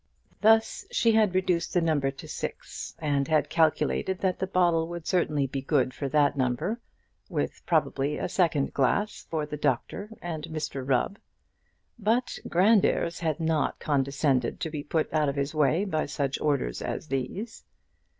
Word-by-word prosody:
Thus 220 +1 +4
she 230 - +3
had 215 -4 +3
reduced 180 -2 0
the - - +5
number 155 -4 +1
to 135 - -9
six, - - -6
and 145 -3 0
had 155 -2 +1
calculated 165 +3 +2
that 185 -1 -1
the 190 - -1
bottle 175 -3 +2
would 170 -1 -7
certainly 155 -6 +1
be 135 0 -3
good 130 -2 +1
for 140 0 -4
that 145 0 +3
number, 140 - -1 0.5
with - - -2
probably 150 -3 +1
a - - -2
second 165 -6 +1
glass 200 +10 0
for 155 -2 -1
the 150 0 -6
doctor 150 - -1
and 160 -3 -5
Mr 155 -4 -4
Rubb. 135 - 0 0.8
But 230 +4 0
Grandairs 190 -2 +3
had 160 -2 -1
not 160 -2 0
condescended 140 -3 0
to 160 - -2
be 150 -2 -3
put 155 +2 -1
out 155 -2 +2
of 140 - -3
his 140 +1 -2
way 155 +5 +2
by 155 -7 -1
such 140 -1 -2
orders 140 - 0
as 155 - -4
these. 135 - -4
155 Hz, 160 wpm, -27 LUFS, 140-180 Hz, 0.8 s, the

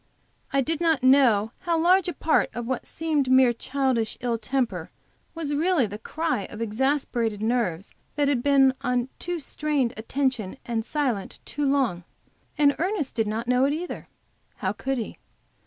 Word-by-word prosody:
I 275 - +3
did 320 +4 -2
not 320 -6 +2
know 245 -5 +5
how 340 -2 0
large 365 +2 +4
a 355 - -2
part 315 +2 +2
of 240 0 -3
what 260 0 -3
seemed 305 -5 -1
mere 260 -2 +6
childish 255 -2 -1
ill 235 -2 -1
temper 255 0 -2 0.5
was 310 -3 -3
really 320 -2 +2
the 210 0 -7
cry 315 -6 -2
of 210 - -10
exasperated 230 -1 0
nerves, 220 -6 -1 0.2
that 290 0 +2
had 275 -4 +1
been 270 -1 +5
on 250 0 0
too 350 0 -3
strained 295 -4 -1
a 220 - -6
tension, 255 -4 -1
and 230 -2 -1
silent 245 -7 -2
too 290 -2 -1
long, 245 -11 +1 0.5
and 285 -1 +4
Ernest 365 -5 -1
did 225 -2 0
not 225 +3 -3
know 250 +1 +3
it 285 - +1
either. 345 +3 -5 0.5
How - - -2
could 270 0 -2
he? 225 - -5
265 Hz, 170 wpm, -25 LUFS, 235-295 Hz, 0.5 s, mere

